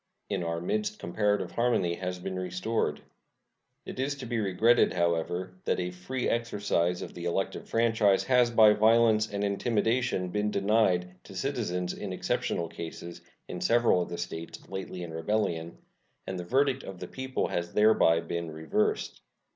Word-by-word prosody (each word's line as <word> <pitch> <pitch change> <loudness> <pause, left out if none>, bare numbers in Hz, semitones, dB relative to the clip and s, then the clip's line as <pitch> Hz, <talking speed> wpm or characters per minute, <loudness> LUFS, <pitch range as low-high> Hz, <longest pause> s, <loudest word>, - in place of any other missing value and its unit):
In 90 - -1
our 85 0 -2
midst 210 - -2
comparative 105 - 0
harmony 115 -8 +1
has 90 -1 -3
been 95 +1 -4
restored. 90 +5 -1 0.8
It - - -7
is 140 +2 0
to 135 - -8
be 120 -1 -1
regretted, 110 +4 +3
however, 85 +1 0
that - - +1
a 90 0 -2
free 120 +9 -3
exercise 100 -7 0
of - - -8
the 85 - -7
elective 90 +3 -2
franchise 110 -4 +3
has 125 -2 +4
by 110 -2 +7
violence 110 0 +4
and 100 0 -2
intimidation 110 0 0
been 105 +2 0
denied 100 -3 +2
to 95 - -11
citizens 95 -8 -2
in 100 -3 -5
exceptional 85 -2 -1
cases 85 +1 -8 0.3
in - - -6
several 115 -6 +3
of - - -4
the 85 - -5
States 80 0 -6
lately 95 -2 -6
in 85 -2 -7
rebellion, 85 -2 -1 0.5
and 95 -1 -4
the 90 - -5
verdict 135 +4 +2
of 95 - -8
the 90 - -6
people 130 +4 -3
has 85 0 -3
thereby 105 -6 +4
been 85 -1 -4
reversed. 80 -1 -1
100 Hz, 160 wpm, -29 LUFS, 90-115 Hz, 0.8 s, by